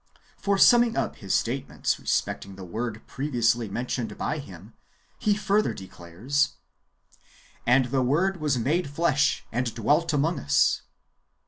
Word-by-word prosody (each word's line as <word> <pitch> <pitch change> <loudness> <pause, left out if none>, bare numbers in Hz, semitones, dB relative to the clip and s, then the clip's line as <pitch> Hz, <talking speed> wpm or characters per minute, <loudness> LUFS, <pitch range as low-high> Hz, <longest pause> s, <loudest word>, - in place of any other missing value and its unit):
For, 200 -1 0
summing 240 +2 +5
up - - -1
his 100 -2 -6
statements 125 +3 -1
respecting 100 -1 -2
the 95 - -9
Word 110 +4 -5
previously 120 -5 0
mentioned 120 +2 -3
by 150 - -2
him, 100 - -11 0.5
he 210 -3 +2
further 210 0 +1
declares, 95 +11 -2 0.5
" - - -29
And 125 +1 +5
the 135 -1 +2
Word 170 +10 +1
was 150 -5 0
made 145 +7 0
flesh, 145 -1 +1
and 120 0 -1
dwelt 150 +9 +2
among 155 +3 +1
us." 70 0 +2
135 Hz, 135 wpm, -26 LUFS, 115-160 Hz, 0.5 s, summing